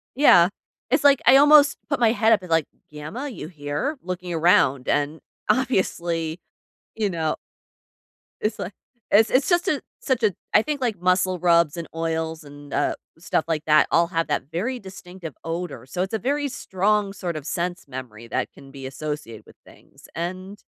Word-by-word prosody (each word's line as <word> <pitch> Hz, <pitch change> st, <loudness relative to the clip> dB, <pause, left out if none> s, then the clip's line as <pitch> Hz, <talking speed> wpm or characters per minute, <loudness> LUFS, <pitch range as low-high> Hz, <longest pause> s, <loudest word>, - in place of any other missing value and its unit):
Yeah. 180 Hz, -11 st, +6 dB, 0.4 s
It's 270 Hz, +4 st, +2 dB
like 280 Hz, -2 st, +6 dB
I 270 Hz, -, +9 dB
almost 290 Hz, 0 st, +6 dB
put 280 Hz, -3 st, 0 dB
my 225 Hz, -2 st, +4 dB
head 225 Hz, -1 st, +3 dB
up, 210 Hz, -, +2 dB
and 180 Hz, -, -10 dB
like, 165 Hz, -2 st, +3 dB, 0.3 s
"Gamma, 155 Hz, -, -6 dB
you 220 Hz, -, -7 dB
hear?" 150 Hz, -, -3 dB
looking 180 Hz, -1 st, -5 dB
around, 160 Hz, -6 st, +3 dB
and, 145 Hz, +2 st, 0 dB, 0.3 s
obviously, 175 Hz, -10 st, 0 dB, 0.6 s
you 210 Hz, -3 st, -1 dB
know 160 Hz, -3 st, -1 dB, 1.1 s
it's 210 Hz, 0 st, -1 dB
li 180 Hz, -, -3 dB, 0.4 s
it's 220 Hz, +2 st, +5 dB
it's 275 Hz, +8 st, +3 dB
just 350 Hz, +1 st, +2 dB
a 300 Hz, -6 st, +1 dB, 0.2 s
such 255 Hz, -3 st, 0 dB
a 210 Hz, -, +4 dB, 0.2 s
I 210 Hz, -, +7 dB
think 290 Hz, +1 st, -3 dB
like 220 Hz, -8 st, -1 dB
muscle 185 Hz, 0 st, +2 dB
rubs 170 Hz, -3 st, +3 dB
and 170 Hz, -1 st, -6 dB
oils 160 Hz, -1 st, -2 dB
and, 145 Hz, 0 st, -12 dB
uh, -, -, +1 dB, 0.2 s
stuff 165 Hz, -1 st, -1 dB
like 155 Hz, -1 st, -1 dB
that 155 Hz, 0 st, +5 dB
all 170 Hz, 0 st, +4 dB
have 165 Hz, -1 st, -1 dB
that -, -, -1 dB
very 230 Hz, +10 st, -2 dB
distinctive 185 Hz, -, -10 dB
odor. 165 Hz, -4 st, -5 dB
So 135 Hz, +7 st, -4 dB
it's 190 Hz, -, -6 dB
a 220 Hz, -, 0 dB
very 285 Hz, +5 st, 0 dB
strong 205 Hz, -3 st, 0 dB
sort 180 Hz, -4 st, -4 dB
of 150 Hz, -2 st, -6 dB
sense 175 Hz, +1 st, -3 dB
memory 125 Hz, -4 st, -9 dB
that -, -, -2 dB
can 135 Hz, 0 st, -15 dB
be 135 Hz, -1 st, -9 dB
associated 135 Hz, -6 st, -6 dB
with -, -, -18 dB
things, -, -, -18 dB
and 185 Hz, +4 st, -5 dB
180 Hz, 180 wpm, -23 LUFS, 155-220 Hz, 1.1 s, I